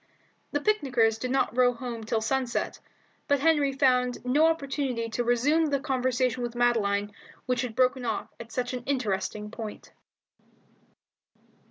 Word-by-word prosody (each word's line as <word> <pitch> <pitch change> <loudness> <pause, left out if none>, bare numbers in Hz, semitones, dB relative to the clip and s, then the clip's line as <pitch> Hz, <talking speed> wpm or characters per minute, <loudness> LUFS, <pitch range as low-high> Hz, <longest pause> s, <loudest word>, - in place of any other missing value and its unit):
The 290 - 0
picnickers 250 - +2
did 255 - -3
not 265 -2 +1
row 250 -1 +4
home 235 -2 -6
till 220 0 -1
sunset, 250 +1 -1 0.5
but 285 -1 +3
Henry 295 -3 +3
found 250 -2 +1
no 290 +6 +4
opportunity 275 -7 -1
to 240 +2 -1
resume 280 +7 +2
the 280 -1 0
conversation 255 -3 0
with 240 0 -4
Madeline 205 -4 +1 0.3
which 250 -1 0
had 245 -4 -4
been 255 - +6
broken 255 0 -4
off 225 -2 -2
at 230 0 -9
such 250 +1 -2
an 250 - -3
interesting 210 -5 -2
point. 220 -2 -8
250 Hz, 150 wpm, -27 LUFS, 230-270 Hz, 0.5 s, been